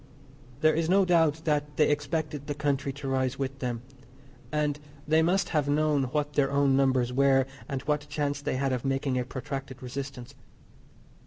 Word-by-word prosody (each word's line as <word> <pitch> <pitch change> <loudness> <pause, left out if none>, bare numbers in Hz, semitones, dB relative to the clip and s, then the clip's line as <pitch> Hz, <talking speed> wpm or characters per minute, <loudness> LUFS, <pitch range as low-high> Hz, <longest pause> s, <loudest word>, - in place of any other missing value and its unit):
There 155 0 +5
is 165 +1 0
no 195 +1 +5
doubt 160 -3 +2
that 150 -1 0
they 150 - +5
expected 150 -1 -2
the 145 - -2
country 140 -2 0
to 140 0 -7
rise 130 -1 0
with 135 0 -3
them, 120 -3 -3 0.7
and 150 -1 0 0.3
they 160 +1 +4
must 180 +4 +2
have 150 -3 +1
known 150 -2 +2
what 145 +3 -2
their 140 -2 +2
own 140 -1 +3
numbers 130 -2 +2
were, 135 0 +4 0.2
and 135 -2 -3
what 150 0 -1
chance 145 -1 -1
they 140 - -2
had 135 0 0
of 125 - -2
making 135 -1 0
a - - 0
protracted 135 0 -6
resistance. 130 -1 -6
140 Hz, 175 wpm, -28 LUFS, 135-150 Hz, 0.7 s, There